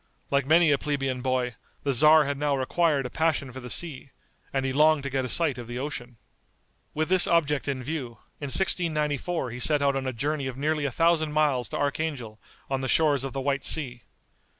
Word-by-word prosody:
Like 140 -1 +1
many 160 0 +5
a 140 - +2
plebeian 135 -3 -2
boy, 130 -1 -1 0.3
the 140 - 0
tzar 155 +4 +6
had 140 0 -2
now 145 -2 0
acquired 145 0 +1
a 125 - -6
passion 160 -5 -1
for 130 - -9
the 125 -1 -9
sea, 140 -2 0 0.4
and 135 -1 -1
he 130 - -2
longed 155 0 +3
to 140 - -5
get 130 -1 -1
a - - -4
sight 150 -5 +1
of 120 - -8
the 120 +1 -6
ocean. 125 -3 -6 0.8
With 155 +1 0
this 185 0 +5
object 150 -4 +1
in 135 -2 -3
view, 135 -4 -5 0.3
in 145 - -5
1694 155 -4 0
he 125 - -7
set 145 +3 +1
out 140 -1 +2
on 135 -1 -3
a - - -1
journey 140 +3 -3
of 130 -1 -6
nearly 150 +1 -1
a 140 - -1
thousand 160 +1 +1
miles 145 -7 +1
to - - -4
Archangel, 140 -7 -3 0.3
on 135 -1 -2
the 130 - -3
shores 145 -2 +2
of 135 - -5
the 135 - -3
White 140 0 -1
Sea. 125 -6 -1
140 Hz, 215 wpm, -26 LUFS, 130-155 Hz, 0.8 s, tzar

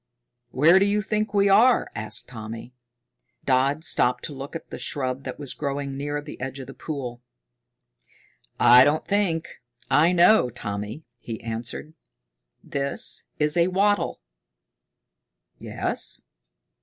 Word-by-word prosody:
"Where 160 +9 +5
do 195 - +3
you 205 +1 +1
think 215 +1 -1
we 200 -1 +3
are?" 225 +6 +4
asked 110 +1 -3
Tommy. 115 0 -8 0.7
Dodd 135 +4 +2
stopped 125 -5 +1
to 150 - -4
look 135 +3 -8
at 165 - -6
a - - -5
shrub 130 -1 -3
that - - -5
was 145 -3 -6
growing 140 -1 -4
near 145 +1 -3
the 145 - -10
edge 135 +1 -5
of 135 - -7
the 135 - -10
pool. 125 -6 -6 1.4
"I 125 +1 +8
don't 150 +3 +1
think, 195 -6 -1 0.3
I 160 +4 +5
know, 180 - +5
Tommy," 105 +4 -6 0.2
he 115 -1 -7
answered. 115 +7 -5 0.7
"This 140 0 -1
is 150 +1 +3
wattle." 190 +4 +1 1.4
"Yes?" - - -4
140 Hz, 130 wpm, -24 LUFS, 125-170 Hz, 1.4 s, I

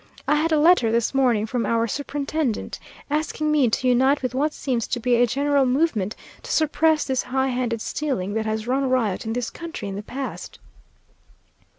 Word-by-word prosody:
I - - +3
had 310 +2 +1
a 310 - +4
letter 300 -8 +5
this 235 +2 +1
morning 245 -6 +2
from 235 +1 -2
our 230 0 +1
superintendent, 285 0 -3 0.3
asking 305 0 -1
me 285 -5 +3
to 255 +3 0
unite 265 +3 +3
with 255 - -2
what 290 +4 +1
seems 250 -6 -2
to 245 - -2
be 245 +1 +1
a 240 +1 +4
general 280 +3 +2
movement 250 - 0 0.3
to - - -8
suppress 315 0 +2
this 265 -2 0
high 265 +1 -1
handed 245 -3 -2
stealing 250 -12 -2
that 220 0 -1
has 215 0 -2
run 265 +2 0
riot 225 -5 0
in 225 - -1
this 245 -1 -3
county 335 - -7
in 195 - -5
the 200 - -4
past. 260 +5 -6
255 Hz, 190 wpm, -23 LUFS, 230-290 Hz, 0.3 s, letter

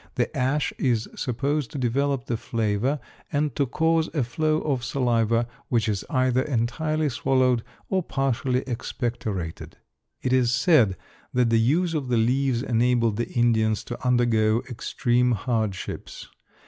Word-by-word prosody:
The - - -1
ash 135 +3 0
is 120 -4 +1
supposed 140 +2 -1
to - - -7
develop 135 +1 0
the 120 - -1
flavor 115 +5 -1 0.3
and 145 -2 0
to 140 - +1
cause 160 +4 +1
a 145 - +2
flow 155 +5 0
of 135 -5 -1
saliva 115 -3 +1 0.2
which 115 -3 +1
is 105 -3 -1
either 130 -1 +2
entirely 150 +5 0
swallowed 130 -1 +2 0.3
or 190 -1 +1
partially 130 -4 0
expectorated. 115 - -4 0.5
It 130 - +1
is 125 -2 +3
said 130 - +4 0.4
that 125 -2 +3
the 115 - +4
use 165 +9 +2
of 145 -5 -2
the 125 -1 +1
leaves 125 +2 +1
enabled 115 -3 +2
the 120 - -2
Indians 110 -3 +2
to 120 - -7
undergo 120 -2 +2
extreme 120 +1 +1
hardships. 110 -3 -3
125 Hz, 140 wpm, -25 LUFS, 115-140 Hz, 0.5 s, said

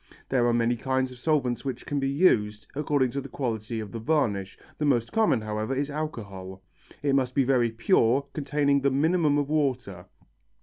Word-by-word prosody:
There 125 -3 +2
are - - +3
many 120 0 +2
kinds 130 +1 -1
of 125 - -11
solvents 130 -5 0
which 135 -2 -5
can 145 - -1
be 135 0 0
used, 110 - +2
according 145 -3 +1
to 140 - -3
the - - -9
quality 115 -3 -3
of 105 -2 -6
the 115 - -5
varnish, 110 -8 0 0.2
the - - -1
most 120 -5 +1
common, 220 - +2
however, 110 +4 -3
is 140 +2 -2
alcohol. 100 -11 -6 0.4
It 140 -1 +2
must 130 -2 +1
be 140 - +4
very 125 -2 +2
pure, 120 - +2
containing 140 -1 +1
the 140 - +3
minimum 150 +2 +2
of 145 -1 0
water. 125 - -1
130 Hz, 185 wpm, -26 LUFS, 115-145 Hz, 0.4 s, be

